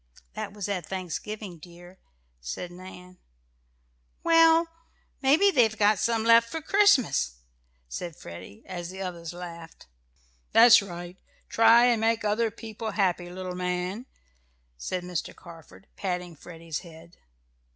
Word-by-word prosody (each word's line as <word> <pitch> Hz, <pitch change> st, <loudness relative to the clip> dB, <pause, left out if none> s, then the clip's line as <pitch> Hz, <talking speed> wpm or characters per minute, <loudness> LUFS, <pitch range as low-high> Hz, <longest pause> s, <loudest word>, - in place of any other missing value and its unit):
"That -, -, -5 dB
was 205 Hz, -2 st, -5 dB
at 185 Hz, -5 st, -3 dB
Thanksgiving, 190 Hz, 0 st, -6 dB
dear," 175 Hz, +3 st, -15 dB, 0.4 s
said -, -, -6 dB
Nan. 180 Hz, 0 st, -12 dB, 1.0 s
"Well, 330 Hz, 0 st, +5 dB, 0.5 s
maybe 310 Hz, +9 st, +4 dB
they've 225 Hz, -, +3 dB
got 205 Hz, -1 st, +3 dB
some 230 Hz, -1 st, 0 dB
left 230 Hz, 0 st, +5 dB
for 325 Hz, -, -4 dB
Christmas," 310 Hz, -, +3 dB, 0.5 s
said 160 Hz, -, -6 dB
Freddie, 85 Hz, +2 st, -11 dB
as 175 Hz, -2 st, -6 dB
the 190 Hz, +1 st, -9 dB
others 170 Hz, -3 st, -6 dB
laughed. 170 Hz, -2 st, -10 dB, 0.7 s
"That's 230 Hz, 0 st, +8 dB
right 175 Hz, -1 st, -9 dB, 0.3 s
try 230 Hz, +1 st, +6 dB
and 235 Hz, -3 st, +2 dB
make 225 Hz, 0 st, +1 dB
other 220 Hz, +2 st, +1 dB
people 220 Hz, 0 st, -7 dB
happy, 180 Hz, -3 st, 0 dB
little 185 Hz, 0 st, -6 dB
man," 180 Hz, +6 st, -3 dB, 0.7 s
said 175 Hz, -, -4 dB
Mr. 180 Hz, -2 st, -5 dB
Carford, 170 Hz, +2 st, -14 dB
patting 180 Hz, -3 st, -4 dB
Freddie's 165 Hz, 0 st, -7 dB
head. 170 Hz, -1 st, -15 dB
185 Hz, 125 wpm, -27 LUFS, 175-225 Hz, 1.0 s, That's